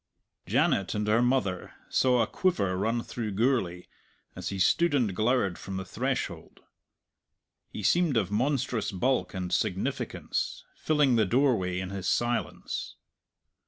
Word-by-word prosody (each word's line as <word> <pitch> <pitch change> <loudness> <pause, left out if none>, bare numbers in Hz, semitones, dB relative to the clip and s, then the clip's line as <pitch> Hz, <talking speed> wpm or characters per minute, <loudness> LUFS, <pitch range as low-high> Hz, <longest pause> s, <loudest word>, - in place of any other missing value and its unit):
Janet 95 +2 +1
and 105 0 -1
her 110 +2 +3
mother 120 -8 0
saw 125 -2 +3
a - - +1
quiver 100 - 0
run 115 +5 0
through 110 -4 -4
Gourlay 95 -6 0 0.5
as 90 0 -4
he 100 - -4
stood 150 - +3
and 115 -9 +1
glowered 110 -4 +1
from 95 0 -5
the 95 - -4
threshold. - - -3 1.1
He 105 - -7
seemed 170 - +3
of 100 -4 0
monstrous 120 -1 0
bulk 125 +4 0
and 90 -1 -3
significance, - - -2
filling 150 -6 +2
the 110 - +4
doorway 115 -7 +2
in 95 0 -5
his 95 -2 -3
silence. 120 0 -2
110 Hz, 135 wpm, -28 LUFS, 95-130 Hz, 1.1 s, the